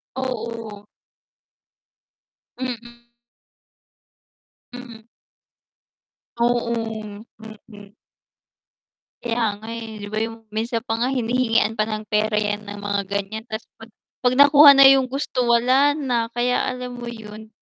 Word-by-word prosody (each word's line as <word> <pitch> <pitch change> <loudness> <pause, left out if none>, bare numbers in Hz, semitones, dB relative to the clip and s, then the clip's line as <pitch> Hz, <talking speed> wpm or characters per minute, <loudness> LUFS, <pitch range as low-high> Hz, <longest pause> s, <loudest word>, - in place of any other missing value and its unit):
Oo. 230 -5 -5 1.7
Mm. 240 -1 -7 1.7
Hmm. 235 -3 -11 1.3
Oo, 240 0 +1 0.7
mm. 210 -2 -14 1.3
Kaya 235 0 -1 0.2
nga, 220 - -12
eh, 225 -1 -7
'di 205 - -7
ba 215 - -1
yung 225 0 -8
minsan 230 +1 -2
pa 225 -2 -3
nga 245 - +1
hinihingian 230 -3 +1
pa 215 - +1
ng 215 -1 -4
pera 215 0 +1
'yan 210 0 -1
ng 205 0 -7
mga 205 0 -1
ganyan 200 +2 -4
ta's 220 +1 -5 0.2
'pag 225 +1 -12 0.3
'pag 250 0 +2
nakuha 285 +1 +8
na 275 0 +8
yung 270 -1 +5
gusto 260 -1 -2
wala 255 +5 +4
na. 245 -6 -1
Kaya 245 +1 +1
alam 250 -1 -7
mo 240 - -7
'yun, 220 -2 -9
230 Hz, 120 wpm, -22 LUFS, 215-250 Hz, 1.7 s, nakuha